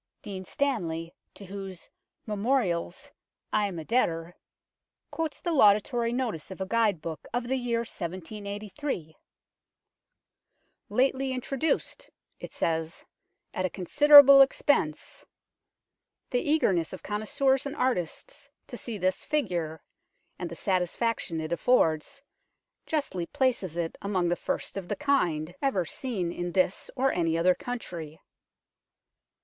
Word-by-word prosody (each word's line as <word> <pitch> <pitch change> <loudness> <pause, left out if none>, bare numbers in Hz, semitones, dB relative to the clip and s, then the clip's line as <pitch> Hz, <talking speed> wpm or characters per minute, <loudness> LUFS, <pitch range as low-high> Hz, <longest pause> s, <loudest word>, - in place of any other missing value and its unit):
Dean 195 -3 -6
Stanley, 170 -11 -2 0.2
to 200 - -11
whose 195 -2 -8 0.4
Memorials 215 +1 -1 0.4
I 210 -1 +3
am 185 -3 -6
a 160 - -6
debtor, 170 -7 0 0.8
quotes 320 -2 -3
the 345 - -2
laudatory 230 -2 +4
notice 235 - -3
of 190 - -9
a 190 - -2
guide 210 -5 +1
book 160 -2 -6
of 245 -1 -1
the 265 - 0
year 240 -2 0
1783. 200 - -5 0.9
" - - -51
Lately 265 +1 +1
intro 255 +2 -4
duced 325 - -1 0.3
(it - - -8
says) 165 -1 -2 0.5
at 185 - -2
a 185 - +1
considerable 280 - +8
expense. 270 - +1 1.1
The 245 - +1
eagerness 190 - +2
of 185 - -8
connoisseurs 265 +6 0
and 280 - -6
artists 255 - -2 0.2
to - - -8
see 230 -3 -5
this 185 0 0
figure, 175 - -2 0.6
and 175 - -4
the 170 - -7
satisfaction 185 0 -1
it 155 +1 -4
affords, 170 - +1 0.6
justly 235 - -2
places 250 - 0
it 165 -1 -3
among 185 -3 0
the 175 - +2
first - - -3
of 190 -3 -5
the - - -2
kind 175 - 0
ever 200 -11 +1
seen 190 -3 -3
in 175 0 -4
this 185 0 +1
or 270 +1 +2
any 165 -2 0
other 180 +2 +4
country." 170 -10 -6
200 Hz, 130 wpm, -28 LUFS, 170-260 Hz, 1.1 s, considerable